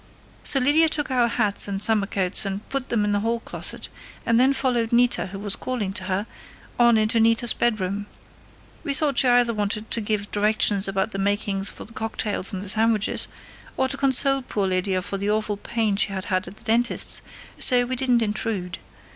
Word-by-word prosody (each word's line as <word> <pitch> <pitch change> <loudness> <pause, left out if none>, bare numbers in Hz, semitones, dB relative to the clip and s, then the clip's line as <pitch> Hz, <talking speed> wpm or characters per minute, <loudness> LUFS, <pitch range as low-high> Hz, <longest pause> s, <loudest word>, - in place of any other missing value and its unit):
"So 275 - +5
Lydia 300 +5 +3
took 295 -3 -3
our 245 -2 +2
hats 205 -3 +1
and 195 -1 -3
summer 210 -1 +4
coats 190 -1 -1
and 195 +1 -5
put 270 -1 -4
them 215 -3 +1
in 205 - 0
the 205 - +1
hall 230 +2 -1
closet, - - -6 0.4
and 230 0 +3
then 260 +2 +5
followed 245 -4 -1
Nita, 240 -2 +2
who 195 +1 -8
was 200 0 0
calling 220 -7 -4
to 185 - -5
her, 190 +2 -2 0.5
on 235 -1 +5
into 215 +1 +1
Nita's 230 +1 +3
bedroom. 205 -3 -1 0.8
We 280 - 0
thought 285 -3 +2
she 260 - +4
either 245 -1 +3
wanted 210 +1 -3
to 230 - +1
give 205 -1 -3
directions 210 -1 +2
about 195 +2 -1
the 195 - -5
makings 200 0 -1
for - - -10
the 230 - -4
cocktails 215 -3 -3
and 190 -1 -5
the 205 - -3
sandwiches, 220 0 +1 0.5
or 265 - +1
to 275 - -1
console 275 0 +2
poor 210 -5 -3
Lydia 185 0 -1
for 195 - -5
the 200 +1 -2
awful 215 -1 -1
pain 215 -1 -1
she 205 - +1
had 190 -1 -5
had 185 -2 -1
at 195 +4 -11
the - - -15
dentist's, 235 +1 +1 0.4
so 245 -2 +5
we 255 +1 -3
didn't 250 -2 +1
intrude. 210 -4 -3
215 Hz, 200 wpm, -23 LUFS, 200-240 Hz, 0.8 s, So